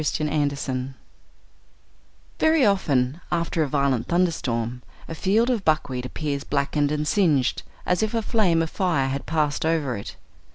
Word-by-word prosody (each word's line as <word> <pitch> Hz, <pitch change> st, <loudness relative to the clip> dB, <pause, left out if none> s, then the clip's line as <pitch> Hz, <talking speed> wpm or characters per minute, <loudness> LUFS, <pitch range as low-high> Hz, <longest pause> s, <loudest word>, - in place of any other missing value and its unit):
THE 155 Hz, 0 st, -1 dB
BUCKWHEAT 140 Hz, -3 st, -1 dB, 1.5 s
Very 315 Hz, -4 st, +4 dB
often, 150 Hz, -7 st, +1 dB
after 170 Hz, -1 st, 0 dB
a 155 Hz, -, +1 dB
violent 140 Hz, -3 st, 0 dB
thunder 175 Hz, 0 st, +2 dB
storm, 120 Hz, -4 st, -3 dB, 0.3 s
a -, -, -6 dB
field 215 Hz, +9 st, +2 dB
of 225 Hz, -5 st, -1 dB
buckwheat 130 Hz, -6 st, 0 dB
appears 145 Hz, 0 st, -3 dB
blackened 145 Hz, +1 st, 0 dB
and 150 Hz, 0 st, -1 dB
singed, 150 Hz, -11 st, +2 dB, 0.2 s
as 180 Hz, +2 st, +1 dB
if 220 Hz, +1 st, -1 dB
a 225 Hz, -, 0 dB
flame 185 Hz, -8 st, +2 dB
of 160 Hz, -, -5 dB
fire 160 Hz, -8 st, 0 dB
had 135 Hz, +1 st, -4 dB
passed 150 Hz, -2 st, 0 dB
over 160 Hz, -6 st, 0 dB
it. 100 Hz, -, -7 dB
150 Hz, 155 wpm, -24 LUFS, 135-175 Hz, 1.5 s, Very